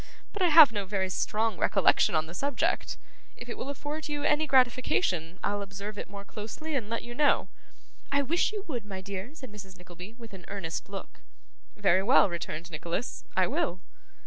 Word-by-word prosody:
But 415 - -5
I 365 - +5
have 310 -5 +9
no 205 -3 -3
very 190 -1 -1
strong 215 +1 0
recollection - - +4
on 155 0 +2
the 165 - -10
subject. 280 +7 -1 0.4
If 245 - -9
it - - -4
will 270 - -5
afford 295 +2 -5
you 290 -1 -2
any 300 +1 +2
gratification, 215 - +2
I'll 205 0 0
observe 200 +1 -6
it - - -6
more 200 0 -8
closely, 225 +11 -6
and 235 -7 -1
let 230 - -2
you 240 - -7
know.' 290 +3 +3 0.6
'I 280 0 +3
wish 335 +9 +1
you 415 -2 -5
would, 245 -7 -3
my 195 -2 -7
dear,' 200 +8 -6
said 260 -7 -10
Mrs. 195 -3 -10
Nickleby, 180 +4 -11
with 230 -4 -11
an 185 -2 -10
earnest 195 -3 -5
look. 195 -1 -8 0.5
'Very 190 -3 +3
well,' 200 -2 +5
returned 170 0 -5
Nicholas. 170 +9 -4
'I - - +5
will. 265 - -1
210 Hz, 190 wpm, -29 LUFS, 190-275 Hz, 0.6 s, have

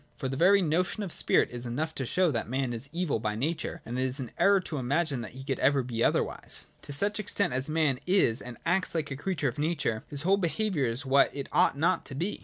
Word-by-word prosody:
For 130 - -3
the 135 - -3
very 190 +6 +5
notion 180 +6 0
of 190 - -5
spirit - - +2
is 120 0 -6
enough 155 +7 -2
to 135 -5 -4
show 180 +2 +2
that 115 -4 -3
man 130 -1 -1
is 120 +4 -5
evil 170 -7 -1
by 105 -1 -2
nature, 155 +9 -3
and 120 +2 -4
it - - +1
is 130 +2 +2
an 125 -4 -5
error 200 0 +5
to 155 -5 -5
imagine 140 +1 0
that 110 -2 -8
he 130 +1 -9
could 135 -1 -2
ever 135 0 +3
be 120 -2 -2
otherwise. - - 0 0.2
To - - -8
such 205 +9 +2
extent 200 -7 0
as 130 +3 -1
man 155 -5 +1
is 180 - +3
and 125 -2 -9
acts 180 +1 +1
like 155 -3 -2
a - - -2
creature 155 0 -2
of 120 - -8
nature, 150 -8 -1
his 145 0 -5
whole 195 +3 +3
be 175 -4 0
haviour 190 - 0
is 120 +5 -2
what 135 +1 +4
it 140 -1 -5
ought - - +3
not 170 +5 +2
to 135 - -7
be. 180 +9 -2
140 Hz, 255 wpm, -28 LUFS, 130-175 Hz, 0.2 s, very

